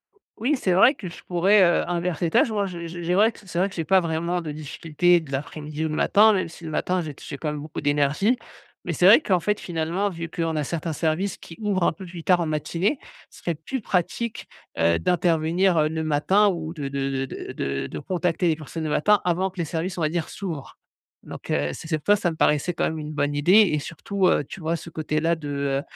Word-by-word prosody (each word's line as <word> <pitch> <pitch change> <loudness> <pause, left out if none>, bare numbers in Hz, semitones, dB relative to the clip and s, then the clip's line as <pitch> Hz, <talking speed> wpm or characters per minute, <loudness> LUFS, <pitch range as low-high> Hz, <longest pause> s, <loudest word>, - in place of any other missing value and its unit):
O - - -30 0.3
oui, 290 +5 +3
c'est 190 -9 0
vrai 230 +9 +6
que 195 - -8
je - - -12
pourrais, 190 +3 +4
heu, 175 -1 +3
inverser 175 -1 -1
les 165 - -1
tâches. 230 - +4
Moi, 205 -2 0
je 170 -2 -6
je 175 +1 -7
j'ai 175 +1 0
vrai 215 +4 +5
q - - -17
c'est 175 - -7
vrai 195 - +2
que - - -12
j'ai 165 - -2
pas 190 +2 +5
vraiment 170 +1 -1
de 155 -2 -5
difficulté 155 +3 +1
de 160 -4 -11
l'après-midi 150 +3 -4
ou - - -1
le 155 - -3
matin, 215 +6 +5
même 185 -3 0
si 170 +1 -13
le 160 - -5
matin, 180 +3 0
j'ai 155 -3 -6
t - - -15
j'ai 140 - -6
quand 150 - -3
même 150 - -5
beaucoup 155 0 -6
d'énergie. 145 - +2 0.5
Mais - - -2
c'est - - +2
vrai - - +9
qu'en 190 - +1
fait, 210 +3 0
finalement, 175 +4 -1
vu 165 -2 -6
qu'on 165 -1 -2
a 150 - 0
certains 165 +2 -3
services 170 +5 -1
qui 165 - -12
ouvrent 200 -4 0
un - - +4
peu 185 +4 -10
plus 170 -2 -9
tard 180 -1 +4
en 170 - 0
matinée, 165 - -1 0.3
ce - - -15
serait 170 - -2
plus 195 - -5
pratique, 210 +4 -2 0.3
heu, 85 0 +3
d'intervenir, 170 - +2
heu, 155 0 +2
le 160 0 -3
matin 160 +7 +3
ou 165 -3 -4
de 145 -4 -5
de 135 0 -2
de 135 0 -1
de - - -7
de 70 0 -3
de 75 - -6
contacter 175 - -1
les 160 - +3
personnes 160 +1 -7
le 155 - -2
matin, 210 +8 +4
avant 180 +2 +1
que 190 - -22
les 170 - 0
services 170 +4 -3
on - - -2
va 155 - +2
dire 170 -1 -2
s'ouvrent. 170 -8 -6 0.5
Donc, - - -10
heu, 75 0 0
c'est - - -9
cette 155 -3 -2
fois 205 - +6
ça 195 -3 0
me 160 - -7
parait 150 -1 +3
c'est 175 +5 -3
quand - - -2
même 160 -1 -2
une 150 0 -6
bonne 145 -1 -1
idée 150 +6 +3 0.2
et 150 - +1
surtout, 185 +6 -1
heu, - - +3
tu - - -9
vois 165 +1 0
ce 170 - -10
côté-là 160 +1 0
de, 150 -2 -8
heu, 140 -1 -1
165 Hz, 260 wpm, -24 LUFS, 155-185 Hz, 0.5 s, vrai